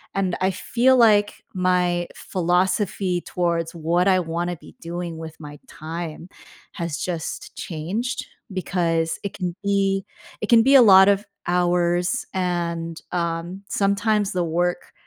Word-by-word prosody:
and 190 -2 0
I 190 +1 +2
feel 245 +7 +2
like 210 -3 +4
my 180 -1 +1
philosophy 185 +1 0
towards 170 -2 -1
what 170 +3 +1
I 185 -1 +4
wanna 175 +1 -2
be - - -16
doing 170 0 -5
with 160 -1 -8
my 145 -2 -10
time 165 +2 -7 0.4
has 170 -3 -4
just 170 -4 -5
changed 190 +10 -3 0.3
because 170 -3 -1
it 200 - -4
can 180 -3 -3
be 195 -1 +1 0.4
it 215 - -2
can 230 -1 +7
be 270 +3 +5
a 265 - +10
lot 190 -4 +8
of 200 +1 +2 0.2
hours, 175 0 +1
and, 170 -3 -2
um, 170 +2 -3
sometimes 205 +1 +1
the 180 -3 0
work, 175 +2 -1
180 Hz, 135 wpm, -23 LUFS, 170-195 Hz, 0.4 s, a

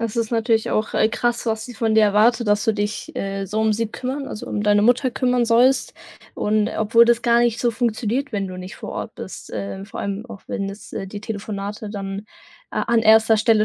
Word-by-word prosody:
Das 230 0 -3
ist 230 -1 0
natürlich 225 -1 +1
auch, 215 - -1
äh, 215 - +3
krass, 240 +1 -1
was 220 -1 -1
sie 245 -1 -9
von 225 -2 0
dir 220 - +6
erwartet, 215 +2 +3
dass 205 0 +2
du 225 - +3
dich, 210 +1 -3
äh, 195 0 -3
so 215 +3 -2
um 220 -1 +3
sie 230 +1 0
kümmern 260 +5 -4
also, 210 - -7
um 205 - -2
deine 205 0 +4
Mutter 250 +3 +3
kümmern 250 -2 +1
sollst. 245 +4 +3 0.4
Und, 215 0 +1
äh, - - -5
obwohl 230 +2 +5
das 235 0 +2
gar 235 0 +4
nicht 240 -1 +2
so 240 - +2
funktioniert, 240 +3 -1
wenn 200 -2 -2
du 185 - -7
nicht 185 +1 -8
vor - - -7
Ort - - -5
bist, - - -9
äh, 100 -2 -5
vor - - -8
allem 200 +3 -4
auch 225 -5 -10
wenn 195 - -2
das 200 +2 -10
äh, 195 - -4
die 205 +1 -7
Telefonate 210 0 -5
dann 195 0 -5 0.5
a - - -1
an 235 -1 +2
1. 220 0 +6
Stelle 215 -1 +3
220 Hz, 235 wpm, -22 LUFS, 205-235 Hz, 0.5 s, dir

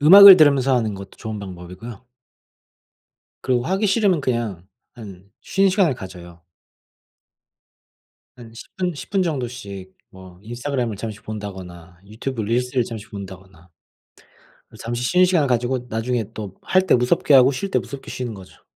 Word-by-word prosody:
음악을 195 +4 +11
들으면서 140 -4 +4
하는 110 -4 0
것도 100 0 -10
좋은 110 -1 -6
방법이고요. 95 +5 -10 1.4
그리고 125 -1 0
하기 195 +4 0
싫으면 195 -5 +2
그냥 115 -9 -3 0.3
한 95 -5 -11 0.2
쉬는 195 0 +1
시간을 185 -7 +2
가져요. 90 -5 -11 1.9
한 115 -2 -13
10 115 - -12
분 180 -2 -1
10 145 - -9
분 195 0 +1
정도씩 120 - -5 0.2
뭐 95 -1 -14
인스타그램을 120 -1 -3
잠시 110 0 -7
본다거나 90 -5 -9
유튜브 110 +3 -5
릴스를 125 +3 0
잠시 110 -2 -8
본다거나 95 -3 -11 1.1
잠시 120 +1 -4
쉬는 180 +7 +4
시간을 170 -6 +2
가지고 125 +1 -1
나중에 115 +1 -1
또 105 -5 -7
할 185 - +2
때 - - +4
무섭게 125 +3 +2
하고 130 +1 +6
쉴 195 +9 -4
때 - - +2
무섭게 140 -1 -8
쉬는 125 -2 -5
거죠. 95 -2 -15
120 Hz, 315 characters per minute, -21 LUFS, 100-135 Hz, 1.9 s, 음악을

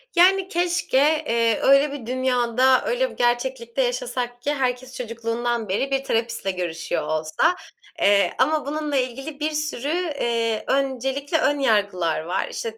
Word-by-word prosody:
Yani, 375 +2 +5
keşke, 350 -6 0 0.3
eee, 230 -1 +2
öyle 275 +2 +5
bir 280 -5 -7
dünyada, 255 0 +2
öyle - - 0
bir - - -13
gerçeklikte 240 0 0
yaşasak 245 0 -3
ki 290 +3 0
herkes 255 -2 -2
çocukluğundan 230 -1 -3
beri 270 +8 -1
bir 270 0 0
terapistle 230 -5 -1
görüşüyor 175 -3 -3
olsa. 155 - +1 0.5
Eee, 200 0 +4
ama 300 +3 +2
bununla 295 0 -3
ilgili 270 +4 -3
bir 305 +1 -1
sürü, 300 -3 -3 0.3
eee, 230 -2 0
öncelikle 275 +3 0
ön 290 -2 +1
yargılar 200 - +1
var. 175 +4 -2
İşte 225 -1 -5
250 Hz, 140 wpm, -23 LUFS, 230-280 Hz, 0.5 s, Yani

